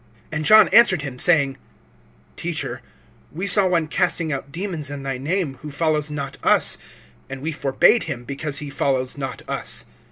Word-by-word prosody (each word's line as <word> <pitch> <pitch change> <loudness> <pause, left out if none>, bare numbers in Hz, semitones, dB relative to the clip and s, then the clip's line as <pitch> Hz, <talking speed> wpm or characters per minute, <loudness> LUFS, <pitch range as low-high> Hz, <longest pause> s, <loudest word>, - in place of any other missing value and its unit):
(38)And 155 0 -2
John 215 +7 +7
answered 200 -5 +5
him, 130 -3 -7
saying: 140 -5 +3 0.8
Teacher, - - -4 0.5
we 180 +6 -4
saw 195 0 +5
one 170 -3 +1
casting 170 -2 0
out 140 0 -6
demons 165 -4 -3
in 145 -1 -7
thy 135 -2 -4
name, 150 -1 -2
who 150 - -7
follows 150 0 -1
not 140 -2 -6
us; - - +3 0.5
and 135 0 -6
we 155 +4 -3
forbade 145 - +2
him, 135 -7 -5
because 140 +2 -3
he 145 -1 -4
follows 130 -2 -1
not 135 -2 -6
us. - - -2
150 Hz, 165 wpm, -21 LUFS, 135-170 Hz, 0.8 s, John